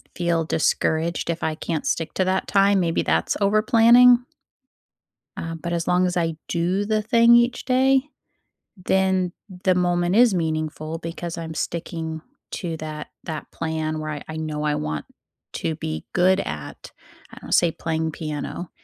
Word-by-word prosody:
feel 170 Hz, -2 st, 0 dB
discouraged 160 Hz, +2 st, 0 dB
if 170 Hz, 0 st, -2 dB
I 160 Hz, -1 st, 0 dB
can't 160 Hz, -1 st, -3 dB
stick 165 Hz, -1 st, -1 dB
to 185 Hz, -, +2 dB
that 185 Hz, +1 st, 0 dB
time, 200 Hz, 0 st, +4 dB
maybe 170 Hz, -1 st, +1 dB
that's -, -, 0 dB
over 205 Hz, +2 st, +3 dB
planning. 240 Hz, +2 st, +6 dB, 1.1 s
Uh, 165 Hz, 0 st, -5 dB
but 170 Hz, +2 st, -5 dB
as 170 Hz, -1 st, -2 dB
long 180 Hz, +1 st, +3 dB
as 180 Hz, -, -1 dB
I 165 Hz, -2 st, 0 dB
do 180 Hz, +4 st, 0 dB
the 215 Hz, 0 st, +1 dB
thing 235 Hz, +1 st, +5 dB
each 240 Hz, +1 st, +2 dB
day, 265 Hz, +1 st, +3 dB, 0.7 s
then 190 Hz, -1 st, +1 dB, 0.3 s
the 185 Hz, -, +4 dB
moment 175 Hz, +1 st, +1 dB
is 240 Hz, -2 st, +6 dB
meaningful 155 Hz, -1 st, -2 dB
because 170 Hz, 0 st, -6 dB
I'm 160 Hz, -1 st, -5 dB
sticking 160 Hz, -1 st, -4 dB, 0.3 s
to 170 Hz, -5 st, -4 dB
that 155 Hz, -1 st, -6 dB, 0.2 s
that 155 Hz, -2 st, -6 dB
plan 160 Hz, -1 st, -3 dB
where 155 Hz, 0 st, -4 dB
I 145 Hz, -2 st, -6 dB
I 160 Hz, 0 st, -6 dB
know 155 Hz, -1 st, -3 dB
I 150 Hz, -1 st, +1 dB
want 75 Hz, -1 st, -3 dB, 0.5 s
to 160 Hz, -, -2 dB
be 80 Hz, -, -5 dB
good 185 Hz, +1 st, +4 dB
at, 75 Hz, -1 st, -6 dB, 0.4 s
I -, -, -12 dB
don't -, -, -10 dB
say 170 Hz, -2 st, +4 dB
playing 160 Hz, 0 st, -2 dB
piano, 155 Hz, +2 st, -5 dB
170 Hz, 160 wpm, -23 LUFS, 160-190 Hz, 1.1 s, planning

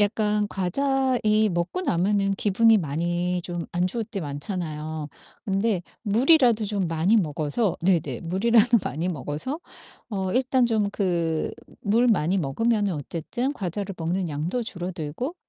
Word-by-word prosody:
약간 210 Hz, 0 st, +2 dB
과자 265 Hz, +8 st, +1 dB
이 215 Hz, 0 st, +4 dB
먹고 175 Hz, -, -2 dB
나면은 195 Hz, -, +1 dB
기분이 220 Hz, +3 st, +4 dB
많이 175 Hz, +3 st, -1 dB
좀 175 Hz, -1 st, -4 dB
안 175 Hz, +1 st, +1 dB
좋을 225 Hz, +5 st, -2 dB
때 205 Hz, -3 st, -5 dB
많잖아요. 155 Hz, 0 st, -4 dB, 0.4 s
근데 195 Hz, -2 st, 0 dB, 0.2 s
물이라도 240 Hz, +1 st, +4 dB
좀 195 Hz, -4 st, -1 dB
많이 165 Hz, +6 st, +2 dB
먹어서 160 Hz, +3 st, 0 dB
네네 175 Hz, -3 st, +1 dB
물이라도 230 Hz, +6 st, +4 dB
많이 160 Hz, +7 st, -3 dB
먹어서 160 Hz, -, -4 dB, 0.5 s
어 190 Hz, -2 st, -2 dB
일단 255 Hz, 0 st, +2 dB
좀 215 Hz, -3 st, +1 dB
그 170 Hz, -5 st, 0 dB, 0.3 s
물 230 Hz, +5 st, +3 dB
많이 185 Hz, -4 st, +2 dB
먹으면은 205 Hz, -, 0 dB
어쨌든 170 Hz, -, -3 dB
과자를 195 Hz, -, -4 dB
먹는 175 Hz, +2 st, -1 dB
양도 160 Hz, +11 st, -2 dB
줄어들고 180 Hz, -, -4 dB
195 Hz, 285 characters per minute, -25 LUFS, 170-225 Hz, 0.5 s, 이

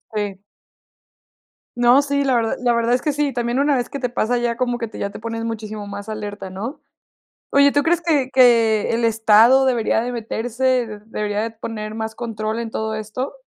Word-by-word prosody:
Sí. 205 Hz, -2 st, -3 dB, 1.3 s
No, 245 Hz, +3 st, +5 dB
sí, 280 Hz, 0 st, 0 dB
la 265 Hz, -2 st, +2 dB
verdad 230 Hz, -2 st, +1 dB
la 245 Hz, -1 st, +2 dB
verdad 235 Hz, +1 st, +1 dB
es 250 Hz, -, +1 dB
que 300 Hz, -, -1 dB
sí, 290 Hz, -1 st, -1 dB
también 240 Hz, 0 st, -1 dB
una 285 Hz, +1 st, +3 dB
vez 245 Hz, -2 st, -2 dB
que -, -, -5 dB
te 250 Hz, -2 st, -2 dB
pasa, 245 Hz, 0 st, 0 dB
ya 240 Hz, -1 st, -1 dB
como 245 Hz, -1 st, 0 dB
que 235 Hz, -1 st, -4 dB
te -, -, -10 dB
ya 200 Hz, -, -2 dB
te 200 Hz, -, -10 dB
pones 230 Hz, +1 st, -4 dB
muchísimo 215 Hz, -2 st, -5 dB
más 200 Hz, +1 st, -7 dB
alerta, 205 Hz, -3 st, -6 dB
¿no?, 220 Hz, -, -6 dB, 0.7 s
oye, 280 Hz, 0 st, +5 dB
¿tú 285 Hz, -, +2 dB
crees 335 Hz, +3 st, +1 dB
que 300 Hz, -6 st, +1 dB
que 230 Hz, -4 st, +4 dB
el 230 Hz, 0 st, +1 dB
estado 225 Hz, +3 st, +5 dB
debería 235 Hz, -3 st, +1 dB
de 245 Hz, +2 st, -3 dB
meterse, 240 Hz, 0 st, -1 dB
debería 210 Hz, -1 st, -2 dB
de 225 Hz, -, -3 dB
poner 220 Hz, -1 st, -6 dB
más 220 Hz, 0 st, -4 dB
control 220 Hz, -1 st, -3 dB
en 230 Hz, -1 st, -5 dB
todo 220 Hz, 0 st, -3 dB
esto? 215 Hz, +6 st, -5 dB
230 Hz, 200 wpm, -20 LUFS, 215-255 Hz, 1.3 s, No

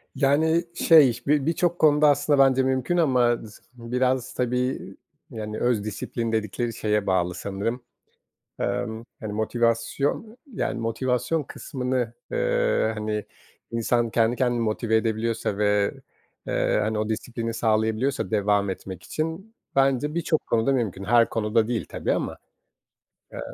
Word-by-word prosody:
Yani, 155 Hz, +5 st, +3 dB
şey, 135 Hz, -8 st, +5 dB
bi 145 Hz, -1 st, +3 dB
birçok 175 Hz, +2 st, 0 dB
konuda 150 Hz, -1 st, +5 dB
aslında 145 Hz, 0 st, +2 dB
bence 135 Hz, -1 st, +5 dB
mümkün 130 Hz, +6 st, 0 dB
ama 125 Hz, -7 st, +3 dB
z 110 Hz, -1 st, -12 dB, 0.2 s
biraz, 125 Hz, +2 st, -1 dB
tabii, 125 Hz, +1 st, -2 dB, 0.3 s
yani, 105 Hz, -1 st, -5 dB
öz 120 Hz, -4 st, +1 dB
disiplin 115 Hz, +2 st, -3 dB
dedikleri 110 Hz, +2 st, -2 dB
şeye 105 Hz, -2 st, -1 dB
bağlı 90 Hz, -2 st, +1 dB
sanırım. 100 Hz, +7 st, -3 dB, 0.8 s
Emm, 115 Hz, -2 st, -2 dB, 0.2 s
hani, 110 Hz, -2 st, -5 dB
motivasyon, 120 Hz, -, -1 dB, 0.2 s
yani, 125 Hz, -, -2 dB
motivasyon 125 Hz, +6 st, 0 dB
kısmını, 125 Hz, -3 st, -3 dB, 0.2 s
eee, -, -, +1 dB
hani, 105 Hz, -1 st, -3 dB, 0.5 s
insan 115 Hz, 0 st, 0 dB
kendi 115 Hz, +1 st, +2 dB
kendini 120 Hz, -2 st, +1 dB
motive 110 Hz, 0 st, 0 dB
edebiliyorsa 110 Hz, -2 st, -1 dB
ve, 105 Hz, -1 st, +2 dB, 0.5 s
eee, -, -, +1 dB
hani, 110 Hz, 0 st, -1 dB
o 110 Hz, 0 st, -1 dB
disiplini 115 Hz, +1 st, -3 dB
sağlayabiliyorsa 110 Hz, +4 st, 0 dB
devam 100 Hz, -2 st, +2 dB
etmek 95 Hz, -1 st, -7 dB
için 165 Hz, -, -4 dB, 0.2 s
bence 135 Hz, +2 st, +2 dB
birçok 165 Hz, -2 st, 0 dB
konuda 115 Hz, +4 st, +2 dB
mümkün, 105 Hz, -7 st, -2 dB
her 115 Hz, +2 st, +4 dB
konuda 110 Hz, 0 st, +1 dB
değil 120 Hz, -2 st, -1 dB
tabii -, -, -2 dB
ama. -, -, -2 dB, 0.9 s
Emm -, -, -7 dB
120 Hz, 130 wpm, -25 LUFS, 110-135 Hz, 0.9 s, şey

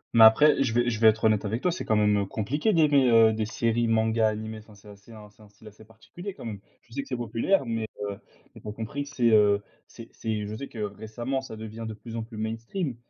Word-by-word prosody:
Mais 115 Hz, -, +8 dB
après, 140 Hz, +6 st, +6 dB
je 115 Hz, -4 st, -1 dB
vais 120 Hz, 0 st, +2 dB
je 110 Hz, -, -3 dB
vais 110 Hz, -, +6 dB
être 110 Hz, +1 st, +3 dB
honnête 110 Hz, -1 st, +3 dB
avec 110 Hz, +5 st, -3 dB
toi, 180 Hz, -, +2 dB
c'est 180 Hz, -, -5 dB
quand 110 Hz, -, +1 dB
même, 105 Hz, -1 st, +3 dB
heu, 100 Hz, -, -1 dB
compliqué 145 Hz, -, -1 dB
d'aimer, 145 Hz, -7 st, +4 dB
heu, 115 Hz, -1 st, +6 dB
des 110 Hz, 0 st, -2 dB
séries 115 Hz, +1 st, 0 dB
mangas 110 Hz, 0 st, +2 dB
animés. 110 Hz, 0 st, -4 dB
Enfin, 105 Hz, -1 st, -17 dB
c'est 100 Hz, +1 st, -19 dB
assez 100 Hz, +3 st, -15 dB
un 105 Hz, -1 st, -12 dB
c'est 110 Hz, -, -24 dB
un 105 Hz, -, -16 dB
style 105 Hz, +1 st, -18 dB
assez 105 Hz, +1 st, -15 dB
particulier 175 Hz, -, -10 dB
quand -, -, -10 dB
même. 105 Hz, -3 st, -6 dB, 0.2 s
Je 115 Hz, -, -20 dB
sais 140 Hz, -, -2 dB
que 140 Hz, -, -12 dB
c'est 130 Hz, -, -3 dB
populaire, 120 Hz, -, 0 dB
mais, 115 Hz, -1 st, -3 dB, 0.2 s
heu, 100 Hz, -1 st, -5 dB, 0.4 s
mais, -, -, -14 dB
tu -, -, -12 dB
as -, -, -3 dB
compris 115 Hz, +6 st, -5 dB
que -, -, -11 dB
c'est, 120 Hz, -4 st, +2 dB
heu, 105 Hz, -1 st, +4 dB, 0.3 s
c'est 115 Hz, -1 st, -12 dB
c'est 110 Hz, -2 st, -3 dB
je 105 Hz, +1 st, -6 dB
sais 140 Hz, -, -6 dB
que 115 Hz, -, -14 dB
récemment, 110 Hz, +6 st, -4 dB
ça 120 Hz, -4 st, -9 dB
devient 110 Hz, +1 st, -8 dB
de 110 Hz, -, -6 dB
plus 115 Hz, +1 st, -10 dB
en 115 Hz, -, -2 dB
plus 110 Hz, -1 st, -11 dB
mainstream, 115 Hz, -, -4 dB
110 Hz, 270 wpm, -26 LUFS, 110-120 Hz, 0.4 s, Mais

